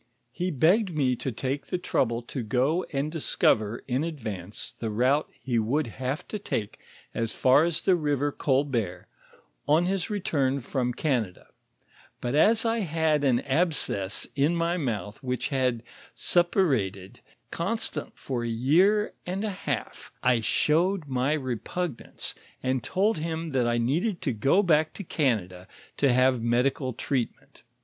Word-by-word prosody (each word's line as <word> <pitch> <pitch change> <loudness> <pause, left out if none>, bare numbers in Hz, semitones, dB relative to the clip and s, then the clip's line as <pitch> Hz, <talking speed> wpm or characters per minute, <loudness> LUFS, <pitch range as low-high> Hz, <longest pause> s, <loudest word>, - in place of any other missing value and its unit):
"He 180 +8 -2
begged 180 - +3
me 130 -3 +2
to 130 - -3
take 135 +4 -3
the 180 - -1
trouble 120 -8 0
to 125 +2 -5
go 130 +10 +1
and 145 +1 -1
discover 115 -8 +1
in 130 +3 0
advance 110 - -5
the 115 - -5
route 130 +7 +2
he 120 -3 0
would 135 +8 +1 0.2
have 130 +3 -2
to 210 - -4
take 105 - -3 0.3
as 115 -1 -2
far 135 +4 +5
as 170 -2 -1
the 185 - +4
river 145 -3 0
Colbert 130 -12 -1 0.6
on 155 +4 +4
his 185 -2 -1
return 140 -10 0
from 125 -1 -1
Canada, 120 - -2 0.7
but 120 - -3
as 220 +10 +4
I 230 0 +1
had 160 -5 +1
an 130 -4 +3
abscess 135 - 0
in 145 +4 +2
my 170 +1 +1
mouth 110 - -3
which 125 -1 -2
had 130 -4 0 0.3
suppurated 130 - +1 0.3
constantly - - -2 0.3
ior - - -3
a - - -2
year 175 - +3
ond 190 +4 -2
o - - -1
half, 165 - -4 0.2
/ 125 -2 +4
showed 170 - +2
my 135 +3 +1
reptignance, 130 - -4 0.3
and 130 -2 0
told 195 0 +1
him 165 0 -3
that 125 -3 +1
I 120 0 +1
needed 170 - 0
to 135 - 0
go 135 - +3
back 155 -3 +3
to 200 - -7
Canada 105 - -1 0.3
to 140 -2 +3
have 130 -1 +3
medical 130 +3 +1
treatment. 125 0 -4
135 Hz, 150 wpm, -27 LUFS, 120-165 Hz, 0.7 s, far